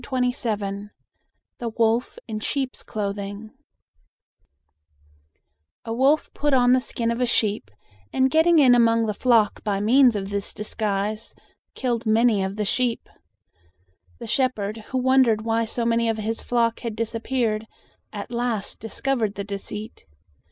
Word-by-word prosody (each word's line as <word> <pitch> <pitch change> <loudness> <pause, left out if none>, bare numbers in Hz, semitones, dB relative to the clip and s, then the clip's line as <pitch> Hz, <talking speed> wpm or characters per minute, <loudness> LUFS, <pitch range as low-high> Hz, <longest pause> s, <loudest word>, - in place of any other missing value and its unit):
THE 225 -6 -2 0.9
WOLF 230 +1 +1
IN 215 -2 -4
SHEEP'S 265 +3 -3
CLOTHING 205 0 -5 2.3
A 225 - -3
wolf 275 +6 +2
put 290 -2 +1
on 245 -1 +4
the 255 0 +4
skin 235 -2 -2
of 235 +2 -2
a 250 - +2
sheep, 210 - 0 0.4
and 265 0 +2
getting 325 +2 +4
in 265 -5 +7
among 230 -1 +4
the 210 - -1
flock 225 -2 +2
by 200 -2 -1
means 245 +3 +5
of 195 -1 -4
this 200 -1 -2
disguise, 210 0 -2 0.4
killed 240 -3 -2
many 220 -2 +3
of 190 +1 -3
the 210 0 -2
sheep. 245 +2 -1 1.1
The 235 - -8
shepherd, 220 -3 -1
who 260 - -3
wondered 255 -4 +3
why 230 0 +1
so 230 +1 -2
many 230 0 +2
of 225 - 0
his 220 +1 -3
flock 230 -2 0
had 230 -3 -5
disappeared, 225 -1 -1 0.4
at 205 +1 -7
last 235 -4 -2
discovered 225 -1 -2
the 200 - -4
deceit. 205 +2 -7
230 Hz, 135 wpm, -24 LUFS, 210-245 Hz, 2.3 s, in